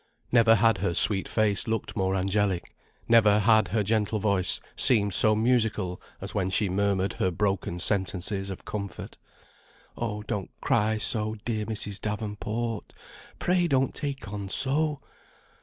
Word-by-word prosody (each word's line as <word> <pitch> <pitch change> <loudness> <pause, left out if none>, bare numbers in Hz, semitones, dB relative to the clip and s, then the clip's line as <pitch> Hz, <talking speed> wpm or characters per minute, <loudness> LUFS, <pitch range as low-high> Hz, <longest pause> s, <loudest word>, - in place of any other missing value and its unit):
Never 115 -2 +5
had 115 0 +2
her 85 - -1
sweet 95 +2 +6
face 105 -2 0
looked 110 -1 -3
more 95 -1 0
angelic, 95 -1 -1 0.3
never 110 -3 +5
had 110 0 +3
her 105 +4 0
gentle 110 +1 0
voice 100 -3 +1 0.2
seemed 105 -5 +3
so 110 +2 +4
musical 110 -5 0 0.2
as 95 - -8
when 95 -3 -1
she 95 +1 0
murmured 100 0 0
her 95 - -1
broken 95 -1 -2
sentences 95 +1 -1
of 95 - -8
comfort. 100 -2 -7 0.8
"Oh, 105 -3 -4
don't 100 -3 -4
cry 110 +1 +1
so, 110 -1 -1
dear 110 -3 -2
Mrs. 105 -2 -4
Davenport, 105 +2 -4 0.4
pray 180 -1 +1
don't 135 -4 +1
take 140 -5 -5
on 100 -2 -5
so. 150 +6 +2
105 Hz, 140 wpm, -26 LUFS, 100-115 Hz, 0.8 s, sweet